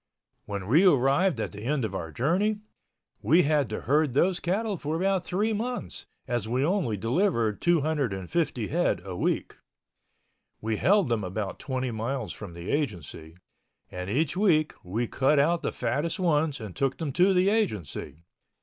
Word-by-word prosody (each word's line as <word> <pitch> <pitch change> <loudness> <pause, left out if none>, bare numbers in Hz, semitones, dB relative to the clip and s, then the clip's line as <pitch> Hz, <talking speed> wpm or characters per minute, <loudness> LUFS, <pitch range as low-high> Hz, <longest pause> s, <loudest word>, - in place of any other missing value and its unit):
When 100 -2 -5
we 145 - +4
arrived 140 -1 +3
at - - -2
the 105 - -9
end 130 +1 0
of 105 - -5
our 85 -4 -4
journey, 195 - 0 0.6
we 175 +2 +4
had 145 -3 +1
to 110 - -4
herd 145 +1 +2
those 175 +6 +2
cattle 205 +4 -1
for 155 -2 -3
about 190 +1 +1
three 210 +6 0
months, 240 +4 -4 0.2
as 120 -4 -1
we 125 +4 +1
only 165 - 0
delivered 115 - 0
250 145 - 0
head 170 - +1
a 95 -2 -5
week. - - -1 1.0
We 110 0 -2
held 200 - +3
them 115 -3 0
about 95 +1 -4
twenty 130 -2 -3
miles 115 -2 -3
from 95 -5 -9
the 85 +1 -5
Agency, 85 - -4 0.5
and 90 +1 -5
each 145 - 0
week 170 -6 +3
we 105 +7 -2
cut 135 +5 +2
out 165 +4 +3
the - - -2
fattest 165 +4 -2
ones 155 -5 +1
and 105 -5 -8
took 135 -1 0
them 160 -4 -3
to 185 +6 +4
the 185 +1 +3
Agency. 100 - -2
140 Hz, 165 wpm, -27 LUFS, 110-175 Hz, 1.0 s, we